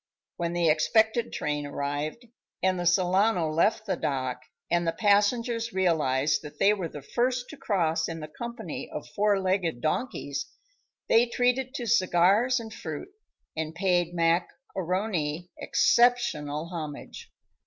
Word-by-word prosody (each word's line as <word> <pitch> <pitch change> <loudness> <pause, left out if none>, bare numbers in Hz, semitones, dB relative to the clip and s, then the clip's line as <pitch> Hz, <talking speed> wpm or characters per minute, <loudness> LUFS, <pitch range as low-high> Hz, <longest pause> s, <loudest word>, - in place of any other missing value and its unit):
When 170 0 -2
the 175 -1 +1
expected 220 +9 +2
train 150 -1 -2
arrived 145 - -4 0.4
and 185 -1 +2
the 175 - 0
Solano 180 -1 +3
left 205 +7 +2
the - - 0
dock 130 -2 -2 0.3
and 170 0 +2
the - - +3
passengers 230 +4 +2
realized 155 -7 +1
that 150 -2 -10
they 205 +1 +4
were 190 -5 -3
the 145 -3 -9
first 245 - -1
to 300 - -10
cross 165 -8 0
in 165 0 -5
the 155 - -6
company 235 +9 -7
of - - -6
four 205 -1 +3
legged 185 -7 0
donkeys, 155 - -2 0.6
they 235 +2 +5
treated 250 +3 0
to 245 - -3
cigars 210 +4 +3
and 220 -1 -8
fruit 160 - -6 0.5
and 160 0 -4
paid 175 -1 +1
Mac 170 +1 +2 0.3
A'Rony 180 -3 -2
exceptional 170 -11 +2
homage. 155 -5 -7
180 Hz, 140 wpm, -27 LUFS, 155-220 Hz, 0.6 s, they